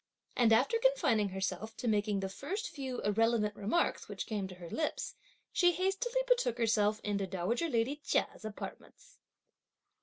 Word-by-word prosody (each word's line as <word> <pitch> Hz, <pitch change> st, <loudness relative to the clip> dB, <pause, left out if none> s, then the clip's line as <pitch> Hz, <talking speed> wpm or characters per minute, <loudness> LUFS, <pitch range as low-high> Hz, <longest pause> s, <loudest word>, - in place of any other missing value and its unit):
And 235 Hz, -2 st, +4 dB
after 455 Hz, -, +4 dB
confining 310 Hz, -, +3 dB
herself 195 Hz, +3 st, -3 dB
to 245 Hz, -, -3 dB
making 210 Hz, -2 st, +1 dB
the 195 Hz, -, -1 dB
first 375 Hz, -, -4 dB
few 265 Hz, -3 st, -4 dB
irrelevant 210 Hz, 0 st, +2 dB
remarks 215 Hz, +13 st, 0 dB
which -, -, -4 dB
came 205 Hz, -4 st, -2 dB
to 185 Hz, -, -10 dB
her 175 Hz, -1 st, -9 dB
lips, 310 Hz, -, -2 dB, 0.4 s
she 355 Hz, -1 st, +4 dB
hastily 390 Hz, +8 st, 0 dB
betook -, -, +2 dB
herself 215 Hz, -2 st, +2 dB
into 200 Hz, -2 st, -1 dB
dowager 195 Hz, -, -1 dB
lady 245 Hz, +3 st, +1 dB
Chia's 290 Hz, -5 st, -1 dB
apartments. 360 Hz, -, -9 dB
230 Hz, 150 wpm, -33 LUFS, 205-340 Hz, 0.4 s, And